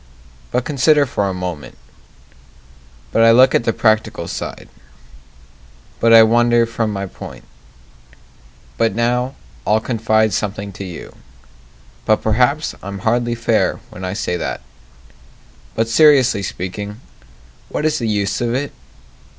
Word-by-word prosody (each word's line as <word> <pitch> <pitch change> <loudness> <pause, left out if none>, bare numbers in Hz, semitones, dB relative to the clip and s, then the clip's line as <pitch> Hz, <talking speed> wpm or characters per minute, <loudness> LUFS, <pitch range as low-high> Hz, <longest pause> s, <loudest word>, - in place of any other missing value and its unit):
But 125 0 -1
consider 150 +1 +3
for 100 -6 -1
a - - -2
moment 90 -5 -6 1.3
But 115 - +2
I 115 - +7
look 130 +3 +6
at 115 - +1
the 115 - +2
practical 110 -1 0
side - - -6 1.3
But 115 - +3
I 115 -1 +9
wander 120 +1 +3
from 115 -1 -2
my 100 -1 -3
point 95 - -10 1.4
But 115 -3 +1
now 125 +3 0 0.3
I'll 110 +7 +2
confide 110 -2 +1
something 100 0 -3
to 100 +1 -8
you 90 -3 -9 0.9
But 110 - +1
perhaps 125 +8 +1
I'm 100 0 -7
hardly 120 +1 +1
fair 115 -1 0
when 95 - -9
I 90 0 -3
say 90 -4 -2
that - - -4 1.1
But 115 0 0
seriously 130 -4 +4
speaking, 100 +3 -5 0.7
what 150 - -3
is 155 -1 +1
the 115 - -2
use 100 -1 -1
of 120 0 0
it? 140 +2 -3
115 Hz, 135 wpm, -18 LUFS, 100-120 Hz, 1.4 s, I